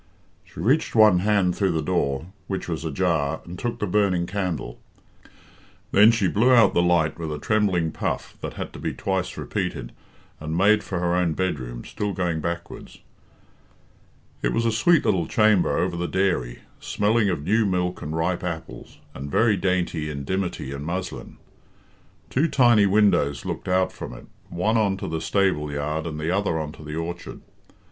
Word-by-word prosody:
She - - -14
reached 130 - +1
one 105 -5 +6
hand 100 -2 +2
through 95 -4 +1
the 80 - 0
door, 75 -5 -1 0.2
which 95 -1 -4
was 80 -2 -3
ajar, 80 -4 0
and 90 +1 -8
took 120 -1 -3
the 105 - -2
burning 95 -3 +1
candle. 90 -9 -3 1.1
Then 105 +2 +7
she 115 -5 +2
blew 115 +8 +3
out 115 -5 +6
the 85 - +3
light 85 -2 +2
with 80 -2 -4
a 75 - -3
trembling 90 -3 +1
puff, - - -3
that - - -5
had - - -6
to - - -9
be - - -3
twice - - -2
repeated, - - -3 0.5
and 80 +1 -3
made 105 +3 +4
for 95 - -4
her 85 0 0
own 90 -2 +1
bedroom, 65 -10 -3
still 105 -1 -3
going 85 -3 -1
backwards. 85 +1 -6 1.4
It - - 0
was 115 0 0
a 115 - +3
sweet 145 +9 +3
little 95 -7 +1
chamber 110 -4 +3
over - - 0
the 85 0 -2
dairy, 85 -12 -1 0.2
smelling 105 0 +1
of 80 -6 -2
new 110 +7 +2
milk 90 -1 -1
and 75 +2 -4
ripe 85 +2 -1
apples, 85 -2 -6 0.2
and 70 +2 -7
very 110 +7 +3
dainty 90 -4 -1
in 70 -2 -5
dimity 90 -4 -3
and 70 +1 -5
muslin. 90 +4 -5 0.9
Two 145 +6 +2
tiny 120 -8 +4
windows 95 -8 +2
looked - - -5
out 95 0 +2
from - - -8
it, - - -12 0.2
one 105 +6 0
on 100 -3 +1
to - - -5
the 80 0 -3
stable 95 -7 +1
yard 75 +3 -2
and 75 -1 -5
the 80 +3 -1
other 95 -3 0
on 75 -2 -3
to 75 - -13
the 75 0 -6
orchard. 85 +2 -6
90 Hz, 180 wpm, -24 LUFS, 80-100 Hz, 1.4 s, Then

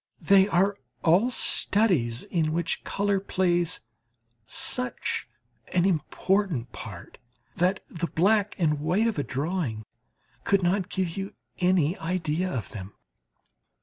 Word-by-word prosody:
They 195 -1 +6
are 195 +2 +2 0.3
all 180 +9 +4
studies 180 - +2
in 155 -3 -1
which 170 0 -1
colour 200 -1 0
plays 180 -3 +1 0.7
such 250 - 0 0.5
an 180 0 +3
important 185 - 0
part - - -10 0.4
that 185 +2 +1
the 170 -1 -4
black 205 +5 +2
and 150 -4 +1
white 175 +9 +1
of 225 -9 0
a - - 0
drawing 140 - -3 0.6
could 195 -2 +2
not 185 +2 +1
give 185 -3 -2
you 195 +1 -5 0.2
any 180 -2 +2
idea 175 +1 -1
of 110 -10 -4
them. 100 -1 -8
180 Hz, 120 wpm, -26 LUFS, 155-195 Hz, 0.7 s, They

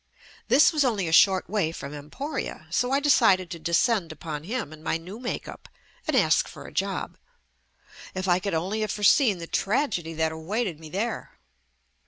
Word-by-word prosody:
This 270 +8 +5
was 300 -2 +3
only 215 -9 0
a - - -2
short 190 +2 +5
way 195 -5 0
from 145 -3 -7
Em 145 0 -9
poria, 275 - -5
so 250 - +1
I 275 - +3
decided 210 -11 +4
to 170 - -6
descend 170 +3 +1
upon 155 -1 -6
him 220 - -4
in 155 - -13
my 160 - -1
new 185 +7 -10
makeup 245 -1 -6 0.4
and - - +2
ask - - +3
for - - -11
a - - -11
job. - - -2 1.0
If 185 0 -3
I 175 0 +3
could 195 -1 -2
only 190 +7 -1
have 215 - -1
foreseen 210 +1 +4
the 170 - -6
tragedy 195 - -1
that 160 0 +1
awaited 175 +2 -3
me 160 -1 -10
there. 210 - -4
185 Hz, 185 wpm, -26 LUFS, 160-230 Hz, 1.0 s, This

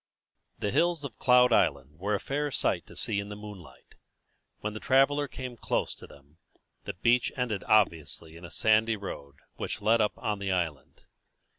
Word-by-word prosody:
The 100 - -2
hills 170 - +1
of 125 - -9
Cloud 125 0 +5
Island 70 +2 +1
were 105 +3 0
a - - -1
fair 145 +5 -2
sight - - -1
to - - -14
see 100 - 0
in 100 0 -5
the 105 - -6
moonlight. 105 -5 -12 0.7
When 105 0 -3
the 110 - -6
traveller 140 +4 +3
came 125 -1 -7
close - - -1
to - - -13
them, 70 +3 -19 0.5
the - - -4
beach 120 +6 +2
ended 115 -6 -1
obviously 80 -5 +1
in 85 - -12
a 85 - -8
sandy 110 +1 +3
road 70 -8 -8 0.2
which - - -4
led 110 +2 +3
up 105 - +1
on 105 -1 -2
the 100 -1 -2
island. 80 -7 -3
105 Hz, 180 wpm, -29 LUFS, 90-125 Hz, 0.7 s, Cloud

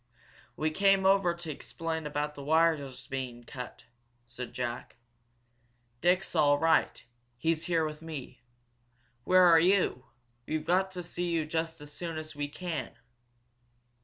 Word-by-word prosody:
"We 155 0 0
came 195 +2 +3
over 190 -3 +4
to 170 -2 -5
explain 160 +1 -4
about 150 0 -2
the 145 - -9
wire's 155 -3 +1
being 125 -3 -5
cut," 125 0 -8 0.4
said 120 +1 -7
Jack. 120 -1 -4 1.1
"Dick's 180 +2 +2
all 145 0 +4
right. 160 +1 +2 0.3
He's 160 +5 0
here 165 -3 +2
with 155 0 -6
me. 150 -6 -8 0.8
Where 185 0 +6
are 170 -2 +8
you? 175 -7 +2 0.4
We've 155 0 -2
got 185 +3 +2
to 180 -1 -5
see 175 +1 -3
you 165 -2 0
just 165 +1 -2
as 150 0 -10
soon 165 -2 -5
as 155 -1 -7
we 145 0 -2
can." 155 -3 -5
160 Hz, 140 wpm, -30 LUFS, 145-175 Hz, 1.1 s, are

